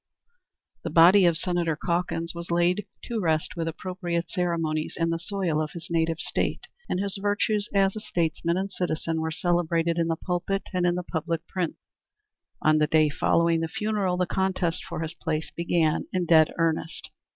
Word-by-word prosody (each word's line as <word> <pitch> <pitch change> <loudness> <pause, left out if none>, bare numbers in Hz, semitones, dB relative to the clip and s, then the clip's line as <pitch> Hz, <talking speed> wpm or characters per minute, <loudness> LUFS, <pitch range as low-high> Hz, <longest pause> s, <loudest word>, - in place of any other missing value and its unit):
The - - -3
body 180 +3 +7
of 170 -2 +2
Senator 175 -2 0
Calkins 170 0 -2
was 170 0 -6
laid 175 +3 +1 0.2
to 235 -2 -3
rest 160 -2 0
with 165 -1 -2
appropriate 175 0 -3
ceremonies 165 -4 -1
in 165 0 +1
the 165 - -1
soil 175 -4 -1
of 155 - -4
his 170 0 -7
native 165 -1 +1
State, - - -1 0.2
and 180 - 0
his 200 0 -2
virtues 205 +1 0
as 195 0 +2
a - - -3
statesman 170 -3 -1
and 195 +1 -2
citizen 165 -2 -2
were 160 - -1
celebrated 170 0 +1
in 165 - +1
the 165 - 0
pulpit 180 +3 -2
and 180 -1 +2
in 175 - +2
the 180 - -3
public 165 -1 -3
prints. 180 -2 -3 0.9
On 155 0 +4
the 150 - +3
day 155 0 +4
following 165 +3 +2
the 165 - -1
funeral 200 0 -1
the 180 - +2
contest 185 -3 -1
for 170 -2 -5
his 160 0 -4
place 160 -2 -3
began 170 -2 +1
in 180 -1 0
dead 160 -2 +5
earnest. 165 -1 -1
170 Hz, 180 wpm, -26 LUFS, 165-180 Hz, 0.9 s, body